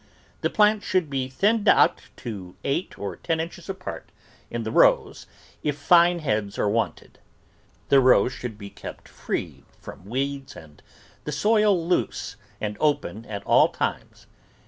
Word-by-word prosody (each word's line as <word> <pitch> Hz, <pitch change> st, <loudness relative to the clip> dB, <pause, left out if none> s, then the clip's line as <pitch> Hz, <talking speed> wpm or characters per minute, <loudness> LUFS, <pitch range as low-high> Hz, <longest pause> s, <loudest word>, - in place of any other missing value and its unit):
The -, -, +1 dB
plants 210 Hz, 0 st, +3 dB
should 180 Hz, -6 st, 0 dB
be 130 Hz, -2 st, -1 dB
thinned 210 Hz, -, +1 dB
out -, -, +5 dB, 0.2 s
to 95 Hz, -6 st, -7 dB
eight 145 Hz, +7 st, -2 dB
or 100 Hz, -, -5 dB
ten 165 Hz, -1 st, -2 dB
inches 170 Hz, +2 st, -6 dB
apart 190 Hz, -1 st, -7 dB, 0.4 s
in 120 Hz, -1 st, -4 dB
the 110 Hz, -, -4 dB
rows -, -, +3 dB, 0.3 s
if 145 Hz, -1 st, -2 dB
fine 175 Hz, +3 st, +5 dB
heads 105 Hz, -10 st, -2 dB
are -, -, +1 dB
wanted. 115 Hz, +3 st, -2 dB, 0.7 s
The 140 Hz, -, +6 dB
rows 125 Hz, -1 st, +4 dB
should 120 Hz, -4 st, -6 dB
be 100 Hz, -1 st, -9 dB
kept -, -, -10 dB
free -, -, -5 dB, 0.2 s
from 90 Hz, -, -11 dB
weeds 135 Hz, +2 st, -3 dB
and 75 Hz, -2 st, -14 dB, 0.4 s
the 150 Hz, -, -3 dB
soil 205 Hz, +1 st, +2 dB
loose 150 Hz, -, -1 dB, 0.2 s
and 105 Hz, -1 st, -4 dB
open 145 Hz, -7 st, -1 dB
at 100 Hz, -2 st, -6 dB
all -, -, +5 dB
times. -, -, -4 dB
140 Hz, 150 wpm, -24 LUFS, 110-175 Hz, 0.7 s, The